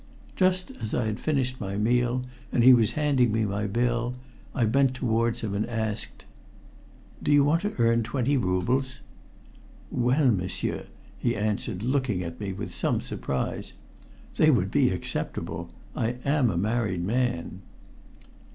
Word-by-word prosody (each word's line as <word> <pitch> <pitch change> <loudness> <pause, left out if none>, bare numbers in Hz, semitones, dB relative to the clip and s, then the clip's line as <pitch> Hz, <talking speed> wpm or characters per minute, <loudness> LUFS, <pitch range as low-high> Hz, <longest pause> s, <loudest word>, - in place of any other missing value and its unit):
Just 185 -1 +1
as 110 -1 -2
I 120 - +1
had 110 -1 -2
finished 130 -5 -1
my 100 -1 -3
meal, 120 +3 +1 0.3
and 120 - +2
he 130 +1 +9
was 115 -4 +4
handing 140 -6 +2
me 110 0 +1
my 100 +1 -1
bill, 120 +3 0 0.4
I 125 -5 +2
bent 130 +3 +3
towards 115 -2 0
him 105 -3 -3
and 100 +1 0
asked 110 -3 -4 1.0
"Do - - 0
you 145 -1 +6
want 155 +4 +2
to 205 +1 -3
earn 115 -1 +3
twenty 130 +4 0
roubles?" 125 +5 0 0.9
"Well, 125 +2 +3
m'sieur," 95 -3 -2 0.3
he 120 0 0
answered, 105 -1 -2
looking 125 -7 0
at 85 -1 -7
me 100 -2 -3
with 95 - -6
some - - 0
surprise. 65 -1 -3 0.6
"They 155 - +5
would 100 -9 +2
be 140 -3 +4
acceptable. 85 -1 -3 0.3
I 115 +2 0
am 140 -3 +3
a 90 - -1
married 105 -2 0
man." 110 -4 -1
120 Hz, 150 wpm, -27 LUFS, 105-130 Hz, 1.0 s, he